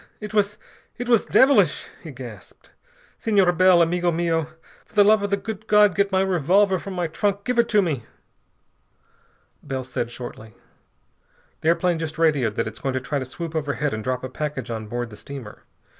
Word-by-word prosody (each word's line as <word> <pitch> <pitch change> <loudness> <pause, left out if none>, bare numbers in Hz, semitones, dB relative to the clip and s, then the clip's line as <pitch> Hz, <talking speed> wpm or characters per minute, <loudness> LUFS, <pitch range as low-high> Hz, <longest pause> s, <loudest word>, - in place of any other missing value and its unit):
_ - - -23 0.2
It 210 0 -7
was 205 -1 +1 0.4
it 245 - -5
was 235 -3 +3
devilish!" 270 +1 +4
he - - -9
gasped. - - -12 0.5
"Senor 200 -5 +3
Bell, 180 0 +5
amigo 175 +1 +1
mio, 165 -2 0 0.4
for - - -27
the 205 - +7
love 215 +1 +5
of 205 - -2
the 200 - +1
good 220 +1 -7
God 210 -2 +5
get 200 +1 +1
my 190 0 +2
revolver 190 +2 +2
from 195 +1 -7
my 175 -1 -1
trunk. 200 +5 -1
Give 250 +1 0
it 235 0 +3
to 210 -3 +4
me...." 140 -10 -2 1.6
Bell 130 -1 -4
said 125 -2 -4
shortly: 120 -3 -9 1.0
"The - - -4
airplane 170 0 +2
just 160 -1 -4
radioed 145 -10 +2
that - - 0
it's 110 +1 -7
going 135 -1 -2
to 130 - 0
try 140 +3 -3
to 130 - -4
swoop 165 +5 -7
overhead 145 -2 -1
and 110 0 -4
drop 130 +1 -2
a 130 - -4
package 140 -2 -4
on 110 -1 -5
board 120 +1 -4
the 105 - -11
steamer. 130 -4 -10
170 Hz, 195 wpm, -23 LUFS, 130-200 Hz, 1.6 s, the